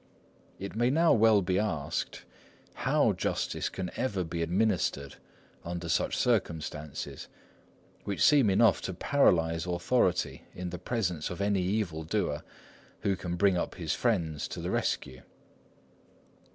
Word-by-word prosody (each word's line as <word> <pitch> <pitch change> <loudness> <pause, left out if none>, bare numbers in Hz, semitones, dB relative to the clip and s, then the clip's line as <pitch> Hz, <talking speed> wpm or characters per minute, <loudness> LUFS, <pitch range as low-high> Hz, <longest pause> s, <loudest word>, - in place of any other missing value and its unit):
It 100 +1 -7
may 120 +2 +2
now 165 +4 +4
well 110 -3 +5
be 90 +1 +1
asked, 85 -9 -3 0.5
how - - +2
justice - - -2
can 90 -1 -5
ever 100 -8 -1
be 85 0 -4
administered 85 -6 0 0.5
under 85 0 -5
such - - +1
circumstances, 80 - -2 0.8
which 100 - -4
seem 140 -7 +6
enough 110 +4 +4
to 95 - -4
paralyse 85 -8 +2
authority 90 +1 +1
in 90 0 -5
the 90 - -6
presence 90 -6 -2
of 90 - -6
any 100 -1 +1
evil 90 -4 -1
doer 80 -4 -1 0.6
who 100 - +1
can 90 -1 -4
bring 95 0 +3
up - - -2
his 80 -4 -2
friends 85 -11 0
to - - -7
the - - -3
rescue. 65 -2 -2
90 Hz, 135 wpm, -29 LUFS, 85-105 Hz, 0.8 s, seem